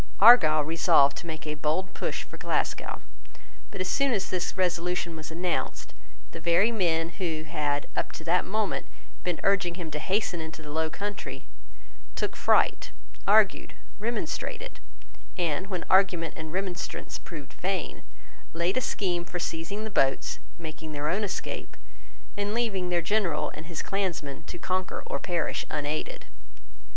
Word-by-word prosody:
Argyle 160 -9 +9
resolved 160 -2 +5
to 170 - -6
make 155 -2 -5
a 150 - -1
bold 155 +5 -1
push - - -2
for - - -12
Glasgow. - - -1 0.7
But, 195 - -4
as 185 - 0
soon 275 +3 +2
as 195 -3 -1
this 185 +1 -1
resolution 175 -1 0
was 155 -1 -6
announced, 175 +2 -2 0.4
the 165 - -7
very 170 +7 +4
men, 165 -6 +2
who 160 -4 -1
had, 150 -2 -1
up - - -1
to 160 - -7
that 175 +2 +3
moment, 210 +1 -1 0.4
been 180 -2 -1
urging 195 -3 +3
him 170 -3 -5
to 150 - -2
hasten 185 -1 0
into 160 0 -7
the 150 - -7
low 160 +1 +1
country, 205 +4 -5 0.7
took - - -2
fright, - - +3 0.4
argued, 210 0 +4 0.2
remonstrated, 330 - -3 0.6
and 175 0 0
when 185 -3 -3
argument 180 -3 +4
and 160 -1 -6
remonstrance 185 0 -3
proved 150 -5 -9
vain, 185 -2 -2 0.5
laid 170 +6 +1
a - - +3
scheme 180 -7 0
for 175 +1 -5
seizing 175 +5 -3
the 220 - -4
boats, 135 -8 +2 0.2
making 160 -1 -7
their 145 +1 -1
own 205 +3 +1
escape, 190 -2 -4 0.6
and 205 +1 -1
leaving 200 -7 0
their 175 -1 +1
General 170 -6 +1
and 155 +1 -8
his 170 -2 -4
clansmen 170 -8 -2
to - - -7
conquer 185 +1 -1
or - - -2
perish 175 -2 -1
unaided. 150 0 -2
175 Hz, 155 wpm, -28 LUFS, 160-195 Hz, 0.7 s, Argyle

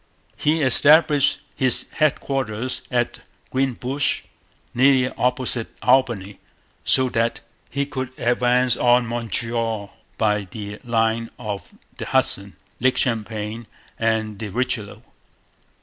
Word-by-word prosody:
He 155 +1 +1
established 145 +2 +4
his 130 -2 +2
headquarters 130 -5 -1
at 120 -2 -1 0.3
Greenbush, 130 +1 0 0.5
nearly 130 0 +4
opposite 125 -2 0 0.2
Albany, 120 -7 +2 0.4
so 130 0 +4
that 115 0 0 0.3
he 140 +1 -1
could 130 -3 -4
advance 125 +1 +2
on 120 0 +3
Montreal 115 -2 -3 0.2
by 105 -2 +1
the 105 0 -7
line 115 -1 0
of 105 -2 -6 0.3
the - - -5
Hudson, - - +1 0.2
Lake 130 +1 +2
Champlain, 110 -1 -2 0.3
and 110 -2 0
the 110 - -4
Richelieu. 110 -1 -1
120 Hz, 100 wpm, -22 LUFS, 110-130 Hz, 0.5 s, established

